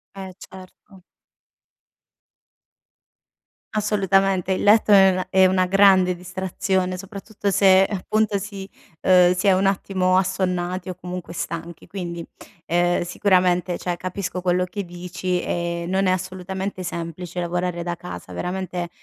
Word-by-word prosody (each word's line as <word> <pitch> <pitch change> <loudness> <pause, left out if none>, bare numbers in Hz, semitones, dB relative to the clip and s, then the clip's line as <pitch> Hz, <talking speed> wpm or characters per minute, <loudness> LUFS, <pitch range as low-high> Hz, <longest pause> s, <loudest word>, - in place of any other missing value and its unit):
Eh, 190 -1 -8
certo. 190 +1 -14 2.7
Assolutamente, 195 -3 +1
il 185 - 0
letto 210 +1 +4
è 195 -1 +8
una 185 0 -1
è 190 0 +5
una 185 0 +2
grande 190 -1 +5
distrazione, 185 +1 -2
soprattutto 200 +2 -5
se, 190 -1 +5
appunto, 210 +1 0
si 195 -1 -7 0.3
ehm, 180 -1 +5
si 180 +3 -1
è 195 - +6
un 190 +1 +2
attimo 190 -1 +1
assonnati 185 -1 -1
o - - -3
comunque 180 -1 -7
stanchi, 170 0 -6
quindi, 175 -3 -6 0.4
ehm, 175 +1 +2
sicuramente, 180 -1 +1
cioè, 175 -1 -3
capisco 185 0 -4
quello 180 0 +1
che 200 +2 -6
dici 180 +1 -3
e 170 0 -3
non 190 +2 +1
è 185 - +3
assolutamente 185 +1 -4
semplice 170 0 -5
lavorare 175 0 -2
da 175 0 -3
casa, 90 - -9
veramente, 180 - -4
185 Hz, 130 wpm, -22 LUFS, 175-190 Hz, 2.7 s, è